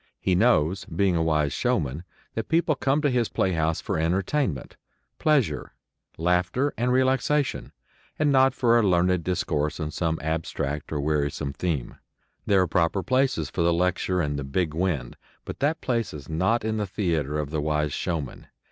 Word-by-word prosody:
He 95 - +1
knows, 95 -4 +2
being 90 +2 +1
a 85 - +1
wise 75 -3 +1
showman, 75 +5 -1 0.3
that 115 - -4
people 165 -1 +3
come 140 +2 0
to 145 - +3
his 120 -3 +1
playhouse 80 -3 0
for - - -2
entertainment, 90 - -1 0.4
pleasure, 150 -7 +1 0.4
laughter 90 - +1
and 125 +2 0
relaxation, 130 +2 +1 0.5
and 150 -1 +2
not 135 -1 +4
for 120 -1 +4
a - - +4
learned 90 -3 +2
discourse 80 -4 -1
on 75 -2 -3
some 80 0 -1
abstract 75 -2 -3
or 75 - -1
wearisome 75 -1 -1
theme. 75 -6 -3 0.5
There 100 -2 +4
are - - -1
proper 90 +3 +1
places 130 - +1
for 90 - -2
the 85 0 +3
lecture 90 +1 +1
and 75 -2 -2
the - - -4
"big 75 +4 -1
wind," 85 -4 -2 0.3
but - - -7
that 150 +4 0
place 115 -8 -1
is 70 -2 -9
not 95 +9 0
in 110 0 -1
the 105 -1 -1
theatre 80 -7 -1
of 75 -1 -3
the 75 -1 -1
wise 75 -1 0
showman. 80 -7 -4
90 Hz, 170 wpm, -25 LUFS, 75-115 Hz, 0.5 s, not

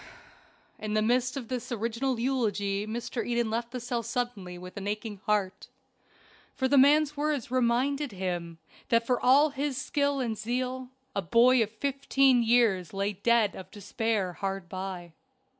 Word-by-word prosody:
In 215 0 -3
the 215 - +2
midst 250 +3 +1
of 250 -4 -5
this 250 -1 -5
original 235 +3 -1
eulogy 210 -5 0
Mr. 230 +1 -3
Eden 235 -2 -1
left 235 +1 -2
the 250 - -5
cell 245 0 -2
suddenly 230 -6 -4
with 180 +1 -10
an 200 0 -5
aching 210 -1 -4
heart, 205 -3 0 0.9
for 260 - +1
the 280 - +2
man's 295 +2 +5
words 290 -5 -2
reminded 255 +3 +1
him 175 -3 -4 0.3
that 230 0 +3
for 250 0 0
all 285 +4 +5
his 280 -1 -2
skill 285 -1 0
and 235 -4 -1
zeal 250 +4 -3 0.3
a 200 - +1
boy 235 +7 +4
of 215 - +1
fifteen 270 +1 +2
years 225 -7 +2
lay 200 +1 -1
dead 220 +1 +2
of 185 -1 -9
despair 205 -2 -2
hard 195 -1 -4
by. 185 -2 -6
235 Hz, 160 wpm, -28 LUFS, 200-255 Hz, 0.9 s, man's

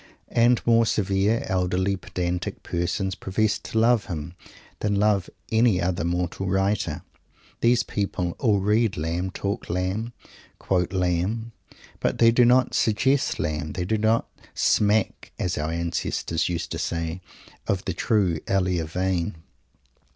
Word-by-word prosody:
And 120 +1 +3
more 115 -1 +4
severe, 100 +2 +1
elderly, 95 +1 0
pedantic 90 -1 -4
persons 90 +2 -1
profess 105 +4 0
to - - -5
love 115 -1 +4
him 85 -1 -5 0.5
than 105 -1 0
love 100 -2 +2 0.2
any 110 -4 +4
other 90 -1 -1
mortal 90 +2 -2
writer. 95 -4 0 0.6
These 120 +1 +3
people 90 -4 -2
all 105 -6 +2
read 105 +1 +2
Lamb, 85 +4 -2
talk 100 +2 -4
Lamb, 95 +7 -2 0.4
quote 90 -2 0
Lamb, 95 +5 -1 0.5
but - - 0
they 115 0 +6
do 120 +1 +5
not 125 +1 +4
suggest 130 +5 +2
Lamb; 75 0 -2
they 90 -1 -3
do 110 +3 0
not 110 +2 +2 0.3
"smack," 105 0 +1
as 90 - -1
our 75 +1 -2
ancestors 85 0 -1
used 85 -1 -3
to - - -3
say, 85 +1 -3 0.5
of 95 -1 -1
the 95 - -1
true 95 -3 +1
Elia 90 -4 +1
vein. 90 +2 -1
95 Hz, 135 wpm, -25 LUFS, 90-110 Hz, 0.6 s, they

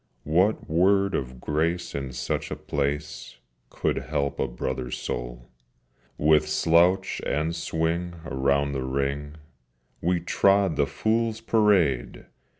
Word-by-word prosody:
What 90 +8 +2
word 95 +4 +3
of 65 -1 -3
grace 85 +5 -1
in 70 -2 -4
such - - -3
a - - -3
place 75 +1 -3 0.3
Could - - -1
help 70 -2 -2
a - - +1
brother's 60 +1 -4
soul? - - -6 0.7
With 75 0 +3
slouch 85 +4 +3
and 80 +3 -1
swing 85 +1 -2
around 70 +1 +1
the 70 -2 -3
ring 70 +3 -2 0.7
We 90 +1 +1
trod 95 +1 +2
the 70 - +1
Fools' 110 0 0
Parade! 100 - +2
75 Hz, 120 wpm, -26 LUFS, 70-90 Hz, 0.7 s, word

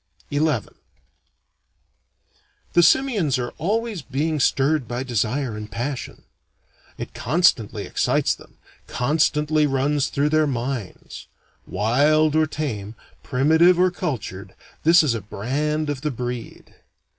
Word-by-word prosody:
XI 145 - 0 2.3
The 175 - +6
simians 200 - +3
are 120 -1 -3
always 215 +2 -1
being 145 +4 -2
stirred 140 0 +2
by 120 +1 -3
desire 125 +1 -1
and 105 0 -7
passion. 130 +2 -5 0.7
It - - -7
constantly 115 - +1
excites - - +1
them, - - -16 0.3
constantly 150 +2 +1
runs 140 +1 +1
through 145 +2 0
their 155 0 +3
minds. 125 -5 -5 0.4
Wild 150 +8 +2
or 155 0 +3
tame, 115 -9 -4 0.3
primitive 160 +7 +3
or 185 0 +4
cultured, 110 - -5 0.3
this 165 +1 +6
is 140 -6 +1
a 115 - -3
brand 145 +10 -2
of 145 -3 -3
the 150 - -1
breed. 125 -2 -6
145 Hz, 115 wpm, -22 LUFS, 125-155 Hz, 2.3 s, The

